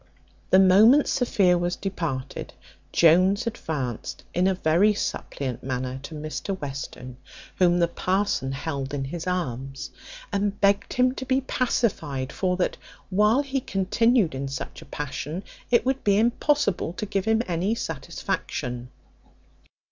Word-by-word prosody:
The 185 Hz, -, +6 dB
moment 210 Hz, +9 st, +7 dB
Sophia 190 Hz, -8 st, +3 dB
was 175 Hz, 0 st, -1 dB
departed, 165 Hz, -9 st, -4 dB, 0.4 s
Jones 185 Hz, +7 st, +4 dB
advanced 145 Hz, -, -4 dB
in 180 Hz, +2 st, +2 dB
a 190 Hz, -, +2 dB
very 180 Hz, +5 st, +3 dB
suppliant 135 Hz, -, -3 dB
manner 130 Hz, 0 st, -3 dB
to 145 Hz, +3 st, -8 dB
Mr 155 Hz, +5 st, -4 dB
Western, 135 Hz, -3 st, -6 dB, 0.4 s
whom 175 Hz, -1 st, +4 dB
the 170 Hz, -1 st, +3 dB
parson 185 Hz, -6 st, 0 dB
held 140 Hz, -1 st, -3 dB
in 135 Hz, -, -2 dB
his 165 Hz, +5 st, -5 dB
arms, 135 Hz, -7 st, -3 dB, 0.4 s
and 200 Hz, 0 st, 0 dB
begged 200 Hz, 0 st, +2 dB
him 255 Hz, 0 st, +3 dB
to 260 Hz, -, -6 dB
be 260 Hz, +1 st, +2 dB
pacified; 165 Hz, -, -1 dB
for 180 Hz, -1 st, 0 dB
that, 180 Hz, -, 0 dB, 0.3 s
while 210 Hz, +8 st, +4 dB
he 270 Hz, -1 st, -2 dB
continued 205 Hz, -, +2 dB
in 135 Hz, +1 st, -3 dB
such 135 Hz, -1 st, -6 dB
a -, -, -12 dB
passion, 150 Hz, +5 st, -5 dB, 0.3 s
it 240 Hz, 0 st, +3 dB
would 265 Hz, +1 st, 0 dB
be 200 Hz, -1 st, +3 dB
impossible 235 Hz, -, +1 dB
to 210 Hz, +3 st, -4 dB
give 195 Hz, -1 st, -2 dB
him 220 Hz, +1 st, +2 dB
any 180 Hz, +5 st, 0 dB
satisfaction. 125 Hz, -, -4 dB
180 Hz, 140 wpm, -25 LUFS, 140-210 Hz, 0.4 s, moment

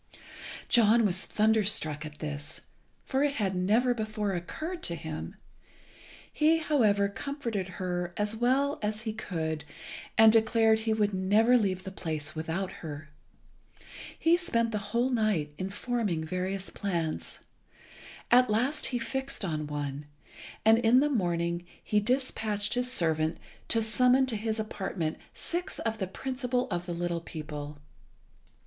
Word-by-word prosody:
John 230 Hz, -1 st, +5 dB
was 190 Hz, -2 st, 0 dB
thunderstruck 205 Hz, -9 st, +2 dB
at 150 Hz, 0 st, -12 dB
this, 150 Hz, 0 st, -5 dB, 0.4 s
for 270 Hz, +1 st, +1 dB
it 285 Hz, -1 st, +1 dB
had 195 Hz, -3 st, 0 dB
never 220 Hz, +7 st, +3 dB
before 215 Hz, -3 st, -2 dB
occurred 315 Hz, -, -4 dB
to 170 Hz, -, -1 dB
him. 155 Hz, 0 st, -6 dB, 1.0 s
He, 315 Hz, +2 st, +4 dB
however, 220 Hz, -11 st, +3 dB
comforted 230 Hz, -3 st, -4 dB
her 180 Hz, -2 st, -2 dB
as 210 Hz, +1 st, -1 dB
well 265 Hz, +5 st, +1 dB
as 210 Hz, 0 st, -2 dB
he 220 Hz, -2 st, -3 dB
could, 160 Hz, -7 st, -3 dB, 0.5 s
and 220 Hz, 0 st, +8 dB
declared 225 Hz, 0 st, +4 dB
he 220 Hz, 0 st, 0 dB
would 210 Hz, -2 st, +1 dB
never 210 Hz, +6 st, +4 dB
leave 190 Hz, -5 st, +1 dB
the 190 Hz, -, -6 dB
place 155 Hz, -5 st, -4 dB
without 165 Hz, +4 st, -3 dB
her. 155 Hz, -1 st, -7 dB, 1.1 s
He 330 Hz, +1 st, +4 dB
spent 230 Hz, -10 st, 0 dB
the 210 Hz, -, -1 dB
whole 240 Hz, +3 st, +1 dB
night 210 Hz, -11 st, +1 dB
in 185 Hz, -, -2 dB
forming 205 Hz, -5 st, -1 dB
various 185 Hz, +4 st, -3 dB
plans. 170 Hz, -6 st, -3 dB, 0.9 s
At 250 Hz, 0 st, +6 dB
last 255 Hz, +8 st, +1 dB
he 250 Hz, -, -1 dB
fixed 265 Hz, -1 st, -3 dB
on 155 Hz, -3 st, -2 dB
one, 145 Hz, 0 st, -4 dB, 0.6 s
and 225 Hz, +1 st, +7 dB
in 240 Hz, +2 st, +5 dB
the 295 Hz, +2 st, +3 dB
morning 170 Hz, -6 st, 0 dB, 0.2 s
he 210 Hz, -, +2 dB
despatched 215 Hz, -3 st, -1 dB
his 250 Hz, +1 st, -1 dB
servant 160 Hz, -7 st, +1 dB, 0.3 s
to 225 Hz, -1 st, +3 dB
summon 250 Hz, +4 st, +4 dB
to 250 Hz, -4 st, -1 dB
his 220 Hz, +1 st, -2 dB
apartment 190 Hz, -6 st, -3 dB, 0.2 s
six 350 Hz, +1 st, -3 dB
of 225 Hz, -1 st, -2 dB
the 190 Hz, -, -1 dB
principal 255 Hz, +4 st, -2 dB
of 175 Hz, 0 st, -2 dB
the 175 Hz, -, -2 dB
little 170 Hz, 0 st, -2 dB
people. 150 Hz, -2 st, -7 dB
210 Hz, 140 wpm, -29 LUFS, 170-240 Hz, 1.1 s, and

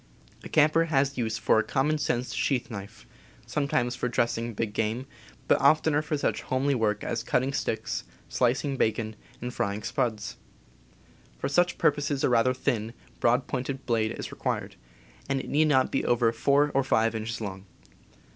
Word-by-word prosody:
A -, -, -8 dB
camper 155 Hz, +2 st, +4 dB
has 140 Hz, -3 st, +1 dB
use 110 Hz, -3 st, -1 dB
for -, -, +3 dB
a -, -, +2 dB
common 150 Hz, +3 st, 0 dB
sense 125 Hz, -3 st, -1 dB
sheath 130 Hz, -3 st, 0 dB
knife, 100 Hz, -2 st, -8 dB, 0.4 s
sometimes 130 Hz, -4 st, 0 dB
for 125 Hz, -, -2 dB
dressing 115 Hz, -1 st, -1 dB
big 105 Hz, -1 st, -2 dB
game, 110 Hz, +4 st, -1 dB, 0.4 s
but -, -, +3 dB
oftener 150 Hz, +1 st, +4 dB
for 150 Hz, 0 st, -2 dB
such -, -, -1 dB
homely 135 Hz, +2 st, 0 dB
work 105 Hz, -4 st, 0 dB
as 115 Hz, -, -2 dB
cutting 130 Hz, +4 st, 0 dB
sticks, -, -, -2 dB, 0.2 s
slicing 130 Hz, +3 st, 0 dB
bacon, 110 Hz, -1 st, 0 dB, 0.3 s
and 125 Hz, 0 st, -4 dB
fry 100 Hz, 0 st, -1 dB
ing 105 Hz, -, -7 dB
"spuds." 110 Hz, -3 st, -2 dB, 1.0 s
For -, -, -2 dB
such 175 Hz, +5 st, +2 dB
purposes 145 Hz, -1 st, +1 dB
a -, -, +4 dB
rather 125 Hz, +1 st, +3 dB
thin, 115 Hz, -4 st, -1 dB, 0.3 s
broad 125 Hz, +2 st, +3 dB
pointed 130 Hz, +1 st, -4 dB
blade 115 Hz, -2 st, +1 dB
is -, -, -6 dB
required, -, -, -3 dB, 0.5 s
and 135 Hz, -1 st, +1 dB
it -, -, -6 dB
need 155 Hz, +2 st, +3 dB
not 130 Hz, -3 st, +3 dB
be -, -, 0 dB
over 120 Hz, -1 st, +3 dB
four 140 Hz, +5 st, +2 dB
or 135 Hz, -, +3 dB
five 115 Hz, -3 st, +2 dB
inches 110 Hz, +1 st, -4 dB
long. 95 Hz, -2 st, -6 dB
125 Hz, 170 wpm, -27 LUFS, 115-140 Hz, 1.0 s, camper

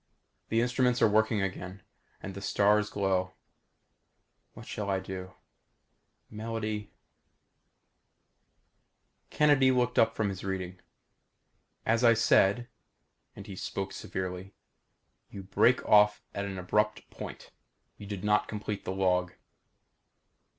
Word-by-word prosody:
The 115 Hz, +1 st, +2 dB
instruments 125 Hz, 0 st, +1 dB
are -, -, +7 dB
working 110 Hz, -1 st, +2 dB
again. 95 Hz, 0 st, -5 dB, 0.4 s
Again 95 Hz, -, -6 dB
the 100 Hz, -, -8 dB
stars 105 Hz, +1 st, +2 dB
glow. 95 Hz, -2 st, -1 dB, 1.2 s
What -, -, -11 dB
shall 105 Hz, -1 st, -4 dB
I 95 Hz, -1 st, +1 dB
do. 95 Hz, -1 st, -7 dB, 0.9 s
Melody.... 110 Hz, -1 st, -4 dB, 2.4 s
Kennedy 145 Hz, -3 st, +4 dB
looked 125 Hz, -1 st, +2 dB
up 115 Hz, 0 st, +3 dB
from 105 Hz, -2 st, 0 dB
his 95 Hz, -1 st, -6 dB
reading. 95 Hz, -2 st, -4 dB, 1.1 s
"As 115 Hz, +2 st, +2 dB
I 115 Hz, -1 st, +6 dB
said," 115 Hz, +1 st, +3 dB, 0.7 s
and -, -, -10 dB
he 100 Hz, -, -8 dB
spoke 95 Hz, +1 st, -4 dB
severely 95 Hz, +1 st, -5 dB, 0.7 s
"you 100 Hz, -, -8 dB
break 100 Hz, +6 st, +2 dB
off 105 Hz, 0 st, +5 dB
at 100 Hz, -, -3 dB
an 95 Hz, -1 st, -5 dB
abrupt 105 Hz, +4 st, 0 dB
point. -, -, -9 dB, 0.5 s
You 105 Hz, -, -10 dB
did 100 Hz, -2 st, -6 dB
not 105 Hz, 0 st, +2 dB
complete 105 Hz, -1 st, -5 dB
the -, -, -2 dB
log." 90 Hz, -2 st, +1 dB
100 Hz, 115 wpm, -29 LUFS, 95-110 Hz, 2.4 s, are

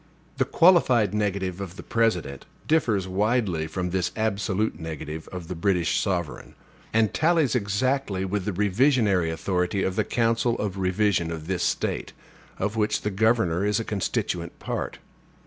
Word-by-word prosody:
The -, -, +2 dB
qualified 130 Hz, -, +4 dB
negative 100 Hz, -3 st, -1 dB
of 95 Hz, -2 st, -6 dB
the -, -, -9 dB
President 90 Hz, -12 st, -1 dB, 0.2 s
differs 110 Hz, -, +2 dB
widely 95 Hz, -4 st, 0 dB
from 90 Hz, +2 st, -3 dB
this 95 Hz, -1 st, 0 dB
absolute 105 Hz, -3 st, -1 dB
negative 80 Hz, -1 st, -6 dB
of 90 Hz, -3 st, -7 dB
the 90 Hz, -, -4 dB
British 90 Hz, 0 st, +1 dB
sovereign; 90 Hz, -7 st, -3 dB, 0.4 s
and 110 Hz, -2 st, +2 dB
tallies 160 Hz, -5 st, +2 dB
exactly 105 Hz, -2 st, 0 dB
with 95 Hz, 0 st, -2 dB
the 105 Hz, -, 0 dB
revisionary 105 Hz, -, +2 dB
authority 90 Hz, +3 st, -1 dB
of 95 Hz, -, -1 dB
the -, -, +2 dB
council 115 Hz, 0 st, +1 dB
of 100 Hz, -2 st, -3 dB
revision 95 Hz, -2 st, +1 dB
of 80 Hz, -2 st, -5 dB
this 90 Hz, 0 st, -2 dB
State, -, -, -1 dB, 0.4 s
of 105 Hz, +1 st, -2 dB
which 105 Hz, -1 st, +1 dB
the 105 Hz, -, -2 dB
governor 100 Hz, -4 st, +2 dB
is 105 Hz, +1 st, +1 dB
a 115 Hz, -, -3 dB
constituent 100 Hz, -3 st, -2 dB
part. -, -, -4 dB
100 Hz, 150 wpm, -25 LUFS, 90-110 Hz, 0.4 s, qualified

